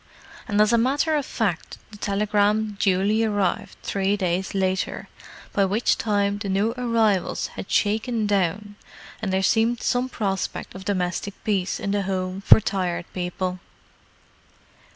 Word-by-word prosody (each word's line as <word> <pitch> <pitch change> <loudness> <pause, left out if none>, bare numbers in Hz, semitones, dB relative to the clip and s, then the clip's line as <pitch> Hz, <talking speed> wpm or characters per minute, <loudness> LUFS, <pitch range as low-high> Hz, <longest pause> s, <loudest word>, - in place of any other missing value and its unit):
And 205 0 0
as 215 +2 +4
a 235 - +5
matter 285 +6 +2
of 290 -3 -1
fact, 195 -7 -2
the 210 - -11
telegram 210 +1 +1
duly 200 +3 +2
arrived 205 -4 -1
three 195 +1 0
days 185 0 -1
later—by 190 +1 -2
which 205 +5 +2
time 205 -2 0
the 205 -2 -4
new 200 +4 +1
arrivals 230 -6 +1
had - - -7
shaken 220 +2 +1
down, 205 +1 -1 0.4
and 205 -3 -2
there 190 0 +1
seemed 225 +4 +2
some 250 +1 +1
prospect 195 -6 -3
of 190 0 -9
domestic 185 0 -2
peace 195 -4 0
in 200 - -2
the 205 0 +1
Home 185 0 -3
for 200 - +8
Tired 185 -5 -2
People. 180 0 -3
205 Hz, 140 wpm, -24 LUFS, 190-220 Hz, 0.4 s, for